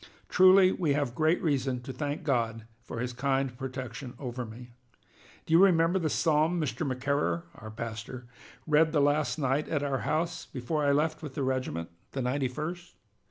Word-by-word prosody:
Truly 185 Hz, 0 st, +7 dB
we 165 Hz, -7 st, 0 dB
have 140 Hz, -4 st, -1 dB
great 155 Hz, +5 st, +2 dB
reason 135 Hz, -5 st, 0 dB
to 130 Hz, -, -6 dB
thank 145 Hz, +4 st, -3 dB
God 115 Hz, -6 st, -1 dB, 0.2 s
for 115 Hz, -1 st, -6 dB
his 125 Hz, 0 st, -3 dB
kind 135 Hz, 0 st, 0 dB
protection 130 Hz, 0 st, -6 dB
over 125 Hz, -2 st, -5 dB
me. 120 Hz, +2 st, -11 dB, 0.7 s
Do 160 Hz, -, -2 dB
you 170 Hz, +4 st, +7 dB
remember 175 Hz, -1 st, +4 dB
the 160 Hz, -3 st, 0 dB
Psalm 155 Hz, +6 st, +2 dB
Mr. 155 Hz, +1 st, -2 dB
McCarer 140 Hz, +6 st, 0 dB
[our 110 Hz, -, -10 dB
pastor] 115 Hz, +2 st, -6 dB, 0.4 s
read 155 Hz, +1 st, +3 dB
the 150 Hz, -, +3 dB
last 145 Hz, +2 st, +2 dB
night 140 Hz, 0 st, 0 dB
at 145 Hz, -3 st, 0 dB
our 135 Hz, -2 st, 0 dB
house, 165 Hz, +2 st, -2 dB
before 145 Hz, +4 st, -2 dB
I 140 Hz, -, +3 dB
left 155 Hz, +2 st, +1 dB
with 150 Hz, -4 st, -7 dB
the 140 Hz, -, -1 dB
regiment, 130 Hz, -12 st, -2 dB, 0.2 s
the 135 Hz, -, -2 dB
ninety 130 Hz, +2 st, 0 dB
first? 170 Hz, +7 st, -6 dB
140 Hz, 175 wpm, -29 LUFS, 125-160 Hz, 0.7 s, Truly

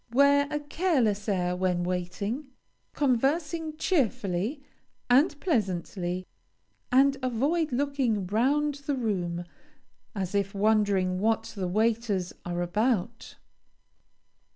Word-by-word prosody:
Wear 280 Hz, +2 st, +4 dB
a 295 Hz, 0 st, -1 dB
careless 285 Hz, -, 0 dB
air 180 Hz, -2 st, 0 dB
when 180 Hz, -1 st, 0 dB
waiting, 185 Hz, +9 st, -3 dB, 0.5 s
conversing 305 Hz, +4 st, 0 dB
cheerfully 250 Hz, -, 0 dB, 0.5 s
and 290 Hz, +4 st, +4 dB
pleasantly, 185 Hz, -, -1 dB, 0.7 s
and 275 Hz, +2 st, +4 dB
avoid 280 Hz, +7 st, 0 dB
looking 255 Hz, -6 st, 0 dB
round 275 Hz, +9 st, +1 dB
the 285 Hz, -, +1 dB
room, 180 Hz, -8 st, -2 dB, 0.7 s
as 190 Hz, -2 st, -3 dB
if 200 Hz, 0 st, -1 dB
wondering 200 Hz, -3 st, +2 dB
what 220 Hz, +2 st, 0 dB
the 190 Hz, -3 st, -2 dB
waiters 215 Hz, -2 st, 0 dB
are 175 Hz, 0 st, -2 dB
about. 225 Hz, +4 st, -1 dB
225 Hz, 100 wpm, -28 LUFS, 185-280 Hz, 0.7 s, Wear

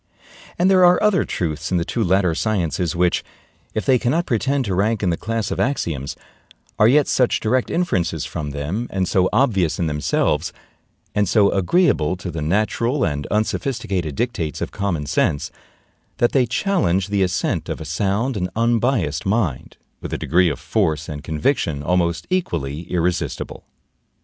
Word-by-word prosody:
And 180 Hz, -, +3 dB
there 185 Hz, -1 st, +5 dB
are 180 Hz, 0 st, +6 dB
other 210 Hz, -3 st, +3 dB
truths 80 Hz, -2 st, -3 dB
in 90 Hz, -, +2 dB
the 85 Hz, -, 0 dB
two 115 Hz, -, -1 dB
latter 90 Hz, -2 st, +2 dB
sciences 90 Hz, -3 st, -1 dB
which, 90 Hz, 0 st, +1 dB, 0.5 s
if 110 Hz, -, -1 dB
they 130 Hz, -3 st, +4 dB
cannot 150 Hz, +9 st, +1 dB
pretend 135 Hz, +3 st, 0 dB
to 100 Hz, -, -2 dB
rank 105 Hz, +3 st, +1 dB
in 90 Hz, -, +2 dB
the -, -, +1 dB
class 115 Hz, +2 st, -3 dB
of -, -, -2 dB
axioms, 80 Hz, -, -1 dB, 0.6 s
are 105 Hz, -, +6 dB
yet 145 Hz, +4 st, +4 dB
such 125 Hz, -2 st, +2 dB
direct 125 Hz, +3 st, 0 dB
inferences 90 Hz, -, 0 dB
from 75 Hz, -3 st, -4 dB
them, 75 Hz, -, -3 dB
and 95 Hz, -2 st, -1 dB
so 95 Hz, +1 st, +2 dB
obvious 105 Hz, -, +2 dB
in 85 Hz, -, 0 dB
themselves, 75 Hz, -1 st, 0 dB, 0.6 s
and 105 Hz, -3 st, +1 dB
so 105 Hz, -3 st, +4 dB
agreeable 95 Hz, -, +2 dB
to 90 Hz, 0 st, -6 dB
the 80 Hz, -1 st, -5 dB
natural 110 Hz, -, 0 dB
and 75 Hz, -3 st, -2 dB
unsophisticated 100 Hz, -, -1 dB
dictates 100 Hz, -, -2 dB
of -, -, -4 dB
common 95 Hz, -7 st, -2 dB
sense, 70 Hz, 0 st, 0 dB, 0.7 s
that 120 Hz, -, +2 dB
they 130 Hz, -3 st, +2 dB
challenge 115 Hz, -, +1 dB
the 100 Hz, -1 st, +1 dB
assent 90 Hz, -1 st, -1 dB
of -, -, -3 dB
a 80 Hz, -, -7 dB
sound 100 Hz, -, -1 dB
and 90 Hz, -2 st, -2 dB
unbiased 115 Hz, -, +1 dB
mind, 95 Hz, -, -1 dB, 0.2 s
with -, -, -6 dB
a -, -, -1 dB
degree 90 Hz, +1 st, +2 dB
of 75 Hz, -, -3 dB
force 80 Hz, -2 st, 0 dB
and 75 Hz, -2 st, -6 dB
conviction 80 Hz, -, -1 dB
almost 85 Hz, 0 st, 0 dB
equally 80 Hz, -, -2 dB
irresistible. 85 Hz, -4 st, -2 dB
95 Hz, 165 wpm, -21 LUFS, 80-120 Hz, 0.7 s, are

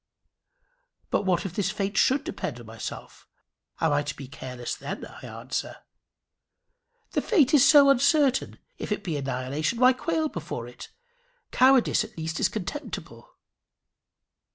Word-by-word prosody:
"But 200 Hz, -, 0 dB
what 180 Hz, 0 st, +1 dB
if 185 Hz, -, -4 dB
this 195 Hz, -1 st, 0 dB
fate 200 Hz, 0 st, -3 dB
should 265 Hz, +2 st, +3 dB
depend 125 Hz, -4 st, -5 dB
on 120 Hz, -, -11 dB
myself? 110 Hz, 0 st, -8 dB, 0.5 s
Am 160 Hz, -, +2 dB
I 145 Hz, -, +2 dB
to 145 Hz, 0 st, -5 dB
be 135 Hz, -, -9 dB
careless 125 Hz, -2 st, -6 dB
then?" -, -, -6 dB
I -, -, -13 dB
answer. -, -, -5 dB, 1.3 s
"The -, -, 0 dB
fate 315 Hz, -, +3 dB
is 285 Hz, 0 st, +7 dB
so 290 Hz, -3 st, +8 dB
uncertain! 275 Hz, 0 st, +2 dB, 0.2 s
If -, -, -5 dB
it 210 Hz, -, -1 dB
be 170 Hz, -6 st, -3 dB
annihilation, 140 Hz, -, -2 dB
why 255 Hz, +1 st, +6 dB
quail 320 Hz, +4 st, -1 dB
before 160 Hz, -, -6 dB
it? 120 Hz, -, -11 dB, 0.6 s
Cowardice 260 Hz, -1 st, +4 dB
at -, -, -12 dB
least 160 Hz, 0 st, -3 dB
is -, -, +2 dB
contemptible." 225 Hz, +9 st, -6 dB
195 Hz, 145 wpm, -26 LUFS, -, 1.3 s, so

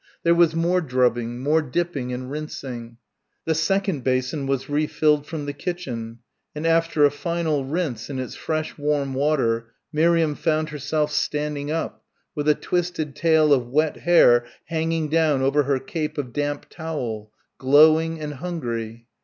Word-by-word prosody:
There 170 Hz, -, +5 dB
was 170 Hz, -2 st, +4 dB
more 175 Hz, +2 st, +2 dB
drubbing, 125 Hz, -3 st, 0 dB
more 155 Hz, +3 st, +3 dB
dipping 150 Hz, -3 st, -2 dB
and 125 Hz, +1 st, -5 dB
rinsing. 125 Hz, -6 st, -6 dB, 0.5 s
The 160 Hz, -, +2 dB
second 175 Hz, -1 st, 0 dB
basin 130 Hz, +3 st, -1 dB
was 135 Hz, -1 st, -1 dB
re 150 Hz, +1 st, 0 dB
filled 150 Hz, -2 st, +2 dB
from 155 Hz, -2 st, -5 dB
the 145 Hz, -, -4 dB
kitchen, 130 Hz, -9 st, -5 dB, 0.4 s
and 150 Hz, +2 st, -4 dB
after 165 Hz, -2 st, +3 dB
a 145 Hz, -, +4 dB
final 155 Hz, -2 st, -1 dB
rinse 145 Hz, -6 st, -3 dB
in 140 Hz, -, -4 dB
its 130 Hz, -1 st, -4 dB
fresh 155 Hz, -1 st, -3 dB
warm 145 Hz, -2 st, 0 dB
water, 130 Hz, -5 st, +1 dB, 0.3 s
Miriam 165 Hz, 0 st, +3 dB
found 155 Hz, +1 st, 0 dB
herself 150 Hz, +1 st, -1 dB
standing 150 Hz, -1 st, -1 dB
up 160 Hz, +1 st, -3 dB, 0.3 s
with 150 Hz, 0 st, -1 dB
a 150 Hz, -, +5 dB
twisted 170 Hz, -5 st, -2 dB
tail 160 Hz, -2 st, +4 dB
of 125 Hz, -3 st, +1 dB
wet 150 Hz, +5 st, +1 dB
hair 120 Hz, -9 st, +5 dB, 0.2 s
hanging 165 Hz, -1 st, -1 dB
down 155 Hz, -3 st, +2 dB
over 140 Hz, +2 st, +3 dB
her 140 Hz, 0 st, +2 dB
cape 150 Hz, +4 st, -4 dB
of 130 Hz, -5 st, -4 dB
damp 145 Hz, 0 st, -2 dB
towel 125 Hz, -10 st, -5 dB, 0.3 s
glowing 155 Hz, +4 st, +5 dB
and 150 Hz, -1 st, -5 dB
hungry. 120 Hz, -8 st, -5 dB
150 Hz, 155 wpm, -23 LUFS, 130-160 Hz, 0.5 s, There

